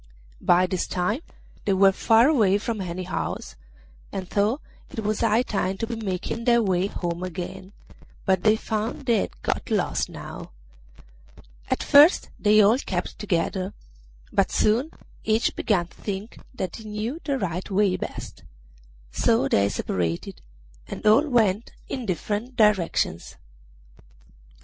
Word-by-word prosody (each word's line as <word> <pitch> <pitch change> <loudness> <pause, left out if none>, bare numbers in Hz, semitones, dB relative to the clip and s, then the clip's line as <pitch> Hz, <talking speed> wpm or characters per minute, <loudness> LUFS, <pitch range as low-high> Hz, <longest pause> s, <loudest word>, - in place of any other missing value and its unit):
By 180 +1 +4
this 185 -1 -2
time 190 - -1 0.4
they 200 - +2
were 195 +1 +6
far 225 +5 +4
away 215 -10 +4
from 215 0 -3
any 185 0 -4
house, 180 - -4 0.6
and 190 -2 -5
thought 210 +8 +1 0.3
it 220 - -5
was 210 0 -1
high 230 +1 +3
time 195 -5 -2
to 225 - -2
be 230 +1 -4
making 215 +1 -4
their 235 -1 +4
way 185 -1 +1
home 175 -3 -4
again, 185 +1 -6 0.5
but 190 -2 +2
they 215 +2 +4
found 220 +4 -3
they 235 -3 +3
had - - -4
got - - -2
lost - - 0
now. - - -9 1.2
At - - 0
first 295 +5 +6
they 215 0 +5
all 220 +6 +4
kept 180 -9 -4
together, 185 0 -1 0.6
but - - +3
soon 235 +8 +2 0.3
each 220 +1 +1
began 185 -6 +1
to 170 - -21
think 200 +2 -5
that 190 -9 -5
he 220 - -11
knew 215 +8 -4
the 280 -3 -1
right 185 -5 -3
way 195 -1 +2
best; 185 - -7 0.7
so 230 - +2
they 100 0 +3
separated, 85 -4 -3 0.5
and - - -7
all 220 +9 +5
went 220 -4 +1
in 250 -4 -5
different 210 +7 -3
directions. 200 - +1
205 Hz, 145 wpm, -25 LUFS, 185-225 Hz, 1.2 s, were